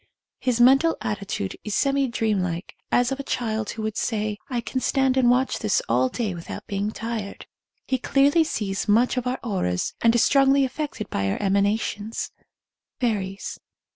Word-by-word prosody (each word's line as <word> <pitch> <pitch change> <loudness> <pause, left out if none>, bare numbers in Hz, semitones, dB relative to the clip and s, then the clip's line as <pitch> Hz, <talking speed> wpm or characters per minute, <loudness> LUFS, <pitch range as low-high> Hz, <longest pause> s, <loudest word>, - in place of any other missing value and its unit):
His 250 -2 0
mental 270 +7 +5
attitude 200 - -3
is 210 - -3
semi 275 -1 +2
dreamlike, 195 -7 -1 0.2
as 245 +1 +3
of 270 - -2
a - - -3
child 220 -5 -2
who 220 - -5
would 215 -1 -2
say 210 -2 -1
I 245 -3 -1
can 255 +2 -3
stand 265 -1 +2
and 255 -2 +4
watch 255 +2 +2
this 215 -3 +2
all 125 +2 +2
day 215 - -2
without 170 -1 -7
be 200 -3 -4
ing 205 +2 0
tired." 225 -2 -5 0.4
He 260 - 0
clearly 285 +6 +4
sees 205 -10 -2
much 230 +5 +3
of 250 -1 -2
our 255 +1 0
auras 135 - -1
and 230 0 +4
is 240 - +4
strongly 275 0 +4
affected 265 -5 -4
by 95 0 0
our - - -1
emana 200 +1 +2
tions. 210 +1 -4 0.7
Fairies. 200 -5 -2
225 Hz, 175 wpm, -24 LUFS, 200-260 Hz, 0.7 s, mental